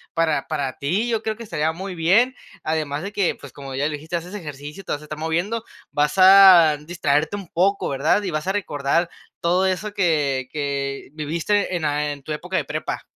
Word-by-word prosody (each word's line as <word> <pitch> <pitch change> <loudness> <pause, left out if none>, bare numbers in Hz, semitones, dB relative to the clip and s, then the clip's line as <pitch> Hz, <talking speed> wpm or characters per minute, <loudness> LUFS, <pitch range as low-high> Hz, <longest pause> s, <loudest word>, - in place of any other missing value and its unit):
para 165 -2 +1
para 140 -5 -2
ti, 185 +12 0
yo 225 -2 0
creo 220 -1 -2
que 230 - -9
estaría 160 -7 -1
muy 190 +3 -6
bien, 195 +10 +3 0.3
además 155 -1 -2
de 200 - -5
que, 200 -4 0
pues, - - -12
como 135 -2 -8
ya 140 +2 0
le 155 - -3
dijiste, 160 +4 -6
haces 175 +3 -5
ejercicio, 150 -1 -8
te - - -6
vas 145 - -4
a - - -11
estar 155 0 -7
moviendo, 175 +8 -1 0.3
vas 150 +2 0
a 185 -5 +8
distraerte 150 +1 0
un 200 -3 -7
poco, 195 +4 +1
¿verdad?, 145 +9 +1
y 190 - -2
vas 155 +2 -3
a 190 - +1
recordar 170 -3 0 0.3
todo 180 +3 +2
eso 205 +3 -2
que 145 -9 +1
que 140 -2 -3
viviste 170 +6 -1
en 170 - -3
la 150 0 0
en 140 -1 -8
tu 155 - -7
época 150 - -3
de - - +1
prepa. - - -4
160 Hz, 210 wpm, -22 LUFS, 150-190 Hz, 0.3 s, a